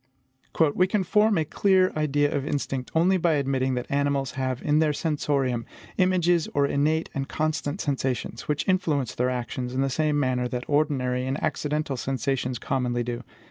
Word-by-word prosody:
"We 185 - +3
can 195 +1 +1
form 210 +2 +3
a 160 - +1
clear 185 +3 +3
idea 145 -1 +1
of 140 - -1
instinct 135 -3 -3
only 180 +4 +4
by 170 -2 +2
admitting 135 -2 0
that 125 - -3
animals 140 -1 0
have 130 -1 -2
in 150 +1 +3
their 155 -2 +2
sensorium, 140 -6 0 0.4
images 175 -2 +3
or 140 0 +4
innate 150 +3 0
and 135 0 -3
constant 155 +1 -2
sensations, 130 -4 -2
which 150 -1 -1
influence 160 - +1
their 125 +1 0
actions 125 0 -4
in 130 - +1
the 135 0 0
same 150 +1 +1
manner 125 -2 0
that 125 0 -4
ordinary 130 -4 +1
and 135 +1 -1
accidental 150 -2 -1
sensations 130 0 -1
commonly 125 -2 -1
do. 120 0 -4
140 Hz, 170 wpm, -25 LUFS, 130-155 Hz, 0.4 s, only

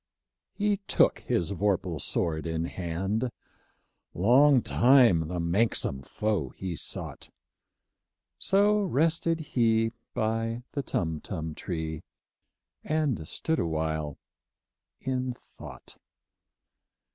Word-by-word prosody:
He 205 -1 +1
took - - +3
his 90 +2 -1
vorpal 95 -5 0
sword 80 -1 -1
in 80 0 -1
hand: 95 +8 -2 0.9
Long 125 - +5
time 120 - +5
the 90 +1 -3
manxome 85 - +1
foe 95 - -1
he 95 +5 -5
soughtŌĆö 80 - -6 1.1
So 205 +2 +3
rested 165 -1 +1
he 115 -2 +3 0.2
by 115 +2 -1
the 140 - -2
Tumtum 80 - -3
tree, 80 -1 -4 0.8
And 150 - 0
stood 160 0 -1
awhile 80 -2 -1 0.8
in 130 -1 -2
thought. - - -12
105 Hz, 90 wpm, -28 LUFS, 80-130 Hz, 1.1 s, Long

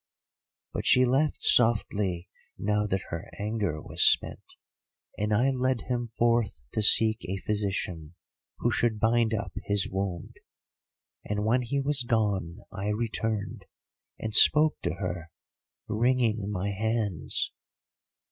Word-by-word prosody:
"But - - -3
she 130 0 +5
laughed 135 +5 0
softly 105 -6 +2 0.3
now 105 +1 0
that 95 -2 -2
her 85 +2 -6
anger 105 -6 -2
was - - -4
spent, - - +2 0.6
and 105 +1 -2
I 120 +6 +3
led 130 -1 0
him 120 -1 -3
forth 115 - 0
to - - 0
seek 110 0 +4
a 95 +3 -3
physician, 95 -6 -3 0.4
who 120 - 0
should 110 0 0
bind 115 +1 +2
up 110 - -3
his 100 -2 +2
wound. 95 -3 -4 0.9
And 105 0 -3
when 120 +3 +2
he 125 +4 -2
was 140 0 +2
gone, 105 -6 -1
I 100 +1 -5
returned, 110 -1 -3 0.5
and 110 -1 -5
spoke 155 +7 +6
to - - -2
her, 90 -3 -5 0.6
wringing 115 -2 +1
my 100 0 -2
hands. 105 -5 -1
105 Hz, 130 wpm, -27 LUFS, 100-120 Hz, 0.9 s, spoke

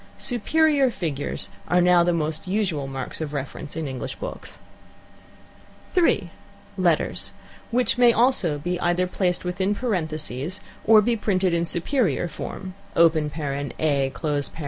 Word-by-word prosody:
"Superior" 280 +3 +2
figures 155 - -3 0.2
are 180 - +3
now 180 -1 +5
the 175 - +2
most 160 0 -2
usual 185 -8 -1
marks 135 +2 -5
of 150 -1 -4
reference 140 +2 -5
in 160 -2 -3
English 130 -2 -5
books. - - -7 1.4
(3) 355 -3 +2 0.4
Letters; - - +1 0.4
which 245 0 +1
also 235 - +4
may 175 0 -1
either 175 +1 +1
be 180 - -9
placed 180 -2 0
within 190 +3 0
parentheses 160 - -2 0.3
or 215 -1 +7
be 235 +2 +2
printed 190 -4 +1
in 170 0 +1
"superior" 175 - +1
form: 185 +4 -7 0.2
(a), 170 0 +7
(b), 155 -2 -2
(c), 140 -1 -1 0.3
&c. - - -6
175 Hz, 135 wpm, -24 LUFS, 150-210 Hz, 1.4 s, or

